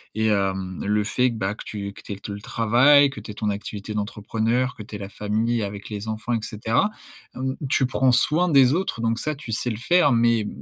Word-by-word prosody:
et 110 0 +1
hem, 95 -3 -1
le 105 +1 +1
fait 125 +4 +1
que, 120 - -5
bah, 100 -1 -2
que - - -9
tu 100 -2 -5
que - - -14
tu - - -6
aies 100 - -9
te 100 - -7
le 100 - -5
travail, 125 +7 +5
que 140 - -8
tu - - -8
aies - - -8
ton 105 0 -2
activité 105 +1 -5
d'entrepreneur, 110 +4 -1
que 105 - -8
tu 105 - -10
aies - - -3
la 100 -1 -7
famille 110 +3 -1
avec 100 0 -6
les 105 0 -6
enfants, 110 +2 -4
et 115 - +1
cetera. 110 - 0 0.5
Hem, 130 +1 -3
tu 135 - +3
prends 130 0 +2
soin 155 +8 +3
des 135 -6 +5
autres, 170 -9 -2
donc 115 0 0
ça, 155 0 -2
tu 140 -4 -8
sais 115 +3 -1
le 110 - -2
faire, 145 +4 +3
mais 115 -2 +2
110 Hz, 245 wpm, -23 LUFS, 105-125 Hz, 0.5 s, travail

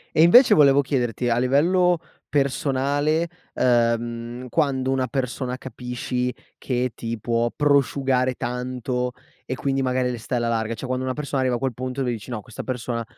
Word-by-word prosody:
E 155 - +5
invece 235 +11 +8
volevo 140 -2 +6
chiederti, 125 -3 -1
a 120 +1 +2
livello 175 +8 +3 0.3
personale, 145 +3 +1 0.3
ehm, 120 0 0
quando 130 -2 0
una 130 -1 0
persona 130 -1 -3
capisci 125 0 -3 0.3
che 125 -1 -1
ti 115 -1 -5
può 115 +2 0
prosciugare 135 -3 +2
tanto 125 0 -3 0.3
e 130 - -4
quindi 135 +1 -1
magari 125 -1 0
le 120 - -5
stai 125 +3 -3
alla 120 0 0
larga. 115 0 -1
Cioè 130 - -7
quando 130 0 -2
una 130 0 -2
persona 145 -2 -2
arriva 130 -1 +1
a 120 - -3
quel 130 -2 -1
punto 130 +3 -4
e - - +1
lui 125 - 0
dici: 115 0 -6
"No, 120 -4 -4
questa 120 -1 -8
persona 120 -2 -3
130 Hz, 175 wpm, -23 LUFS, 120-135 Hz, 0.3 s, invece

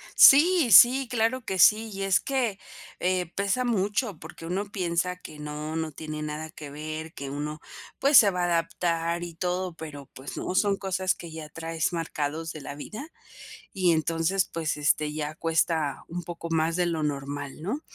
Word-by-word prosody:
Sí, 320 0 +7
sí, 255 +6 +8
claro 245 +1 0
que 190 -3 -3
sí. 220 +5 +6
Y 195 -1 -4
es 195 -1 +3
que, 250 -7 -1 0.4
eh, 180 -1 0
pesa 200 +6 0
mucho 205 - -1
porque 160 +1 -10
uno 185 +5 -2
piensa 180 -2 -1
que 155 -4 -11
no, 150 +1 -5
no 160 -1 -2
tiene 155 0 -6
nada 150 +1 -5
que 150 -3 -9
ver, 155 +2 -6
que 140 -1 -6
uno, 150 +2 -4 0.4
pues, 280 0 +6
se 205 - +8
va 180 -2 -2
a - - +3
adaptar 170 0 0
y 170 -1 -6
todo, 180 +1 -2
pero, 145 -4 -9
pues, 130 +2 -8
no, - - -3
son 200 0 +2
cosas 190 -1 -1
que 170 - -10
ya 160 -1 -8
traes 165 +1 -3
marcados 160 -1 -3
de 155 - -8
la 140 - -7
vida. 215 - -8 0.7
Y 185 -3 +3
entonces, 165 +4 +1
pues, 160 -3 -2
este, 150 0 +1
ya 150 0 -4
cuesta 160 -3 0
un 175 +1 -5
poco 170 0 -7
más 165 0 +1
de 180 -1 +1
lo 165 -2 -1
normal, 145 0 -4
¿no? 220 - -2
165 Hz, 185 wpm, -27 LUFS, 155-195 Hz, 0.7 s, sí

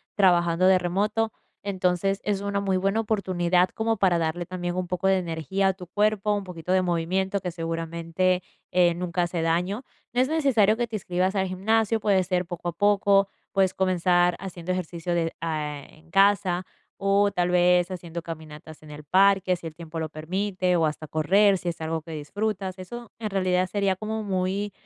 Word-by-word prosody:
trabajando 175 -2 +3
de 190 0 +6
remoto, 210 +5 0 0.3
entonces 195 0 0
es 205 -2 -1
una 200 0 -1
muy 195 -2 +1
buena 195 +4 +1
oportunidad 185 -5 +1
como 225 0 -1
para 185 -3 +3
darle 165 +2 -2
también 175 -1 -4
un 185 0 -1
poco 180 +1 -1
de 195 0 +4
energía 180 +2 -1
a - - +1
tu 185 -1 -11
cuerpo, 210 +2 +1
un 205 - -3
poquito 180 -2 -6
de 185 0 +3
movimiento 185 +3 0
que 180 - -3
seguramente, 165 +2 -1 0.3
eh, 175 -1 +4
nunca 175 0 -1
hace 170 -1 -2
daño. 180 +8 0 0.3
No 245 - +3
es 260 - +2
necesario 245 -10 +3
que 240 - 0
te 220 - -6
inscribas 185 0 -1
al 190 -1 +1
gimnasio, 220 +4 +1
puede 200 -3 +2
ser 180 -1 -1
poco 175 0 -5
a - - -3
poco, 200 +1 +3 0.2
puedes 190 -1 +2
comenzar 180 -1 +2
haciendo 185 -1 -4
ejercicio 175 -1 -3
de 165 -1 0
a 150 -3 -3
en 165 +1 -21
casa 195 -2 +3 0.3
o 200 +1 +2
tal 175 0 0
vez 180 0 +4
haciendo 170 -2 -6
caminatas 155 -1 -9
en 150 - -12
el 150 0 -9
parque, 190 +3 +4
si 170 - -12
el 160 - -5
tiempo 165 0 -7
lo 160 - -2
permite, 185 +3 -1
o 165 -2 +3
hasta 155 0 -3
correr, 195 +7 +3
si 180 - -3
es 165 -1 -6
algo 160 0 -2
que 165 - -10
disfrutas. 190 +5 -3
Eso 235 +5 -9
en 220 -2 -4
realidad 185 -1 +1
sería 195 0 0
como 215 +2 -4
muy, 195 0 -1
185 Hz, 190 wpm, -25 LUFS, 170-200 Hz, 0.3 s, de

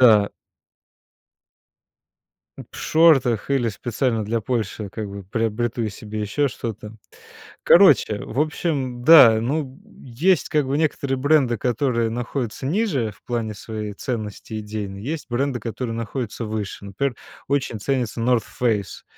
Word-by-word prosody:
Да. 110 -5 +6 2.3
П - - -8
в - - -12
шортах 140 -9 +3
или 130 -4 +2
специально 115 +2 -1
для 115 +2 -1
Польши 110 -3 -3
как 110 -2 -5
бы 100 0 -8
приобрету 115 +2 -1
себе 105 +1 -7
ещё 140 +8 0
что-то. 110 -3 -6 0.7
Короче, 150 - +6
в 125 - -6
общем, 145 -5 -1
да, 125 -7 +8
ну, 135 +2 -2 0.4
есть 180 -8 +3
как 150 -3 +1
бы 135 +2 0
некоторые 140 -3 0
бренды, 135 -3 +3
которые 120 -1 0
находятся 120 +1 -4
ниже 150 - 0
в - - -23
плане 115 -3 -3
своей 105 -1 -6
ценности 110 -2 -5
идейной, 105 -2 -6
есть 150 +5 -4
бренды, 130 +1 0
которые 115 0 -4
находятся 115 0 -4
выше. 105 -2 -5
Например, 115 +5 -2 0.3
очень 135 -6 -1
ценится 125 -2 -1
North 120 -1 +2 0.2
Face, 110 -5 -1
120 Hz, 130 wpm, -22 LUFS, 110-135 Hz, 2.3 s, да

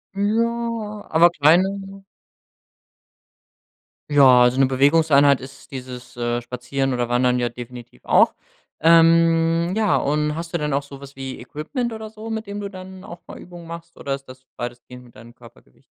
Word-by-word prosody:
Ja, 225 0 -2
aber 165 +2 +5
kleine 195 +5 +1 2.1
Ja, 130 -4 +6
so 130 - -4
'ne 135 - +5
Bewegungseinheit 140 +1 +4
ist 135 +2 -13
dieses, 125 -2 -9
äh, 120 0 -2
Spazieren 125 +3 -3
oder 120 -1 -1
Wandern 125 +1 +1
ja 120 - 0
definitiv 120 - -11
auch. - - +4 0.5
Ähm, 165 +1 +4
ja, 215 -3 +2
und 150 +1 0
hast 165 +1 -7
du - - +1
denn 150 -2 -2
auch 140 +1 0
so 140 -1 -12
was 140 0 -13
wie 135 -1 -7
Equipment 195 - -5
oder 220 -1 -7
so, 220 +1 -10
mit 220 0 -4
dem 200 0 -6
du 205 - -4
dann 190 0 -11
auch 175 -5 -11
mal - - -10
Übungen 175 -1 -12
machst 170 0 -10
oder 140 - -4
ist 135 0 -13
das 130 0 -14
weitestgehend 120 +1 -8
mit 120 - -20
deinem 115 +2 -14
Körpergewicht? 115 - -20
150 Hz, 165 wpm, -21 LUFS, 125-185 Hz, 2.1 s, Ja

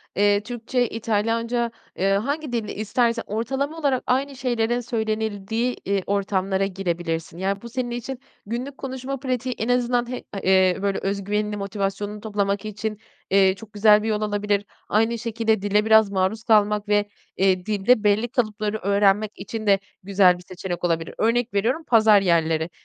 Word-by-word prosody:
eee, 205 0 +3
Türkçe, 245 +1 -1
İtalyanca, 230 +2 -1 0.2
eee, 195 +2 +1
hangi 280 +8 -1
dilde 230 -3 -3
istersen 230 +2 0
ortalama 270 +8 -2
olarak 275 -5 +1
aynı 270 +2 0
şeylerin 240 -2 0
söylenildiği, 220 0 -2
eee, 195 -1 0
ortamlara 195 -1 0
girebilirsin. 175 -4 -3
Yani, 195 +2 -2
bu 235 - -9
senin 245 0 -3
için 245 +2 -5 0.3
günlük 250 +6 -5
konuşma 265 0 -5
pratiği 255 -1 -2
en 225 - -2
azından 245 -1 +1
h 250 - -5
a 200 - -3
eee, 190 -1 +3
böyle, 200 -1 0
öz 200 0 -2
güvenini, 210 +1 -1
motivasyonunu 200 +1 -3
toplamak 205 -1 -1
için, 215 0 -4 0.3
eee, 190 -1 +4
çok 215 +1 -13
güzel 210 0 +5
bir - - -2
yol 215 -1 0
olabilir. 205 -1 0 0.2
Aynı 225 +2 +2
şekilde 225 -2 0
dile 205 +1 +2
biraz 220 -2 +5
maruz 195 +4 0
kalmak 210 -1 +3
ve, 205 0 +2 0.3
eee, 185 -1 +2
dilde 215 +2 +2
belli 210 +3 +3
kalıpları 215 -3 -1
öğrenmek 200 +1 +2
için 220 -2 -6
de 195 -1 +5 0.2
güzel 185 -2 +4
bir 180 - -14
seçenek 180 -1 -5
olabilir. 165 -2 -1
Örnek 235 +1 +1
veriyorum: 235 +11 0
pazar 220 -3 +6
yerleri. 165 -3 +1
210 Hz, 160 wpm, -23 LUFS, 200-235 Hz, 0.3 s, pazar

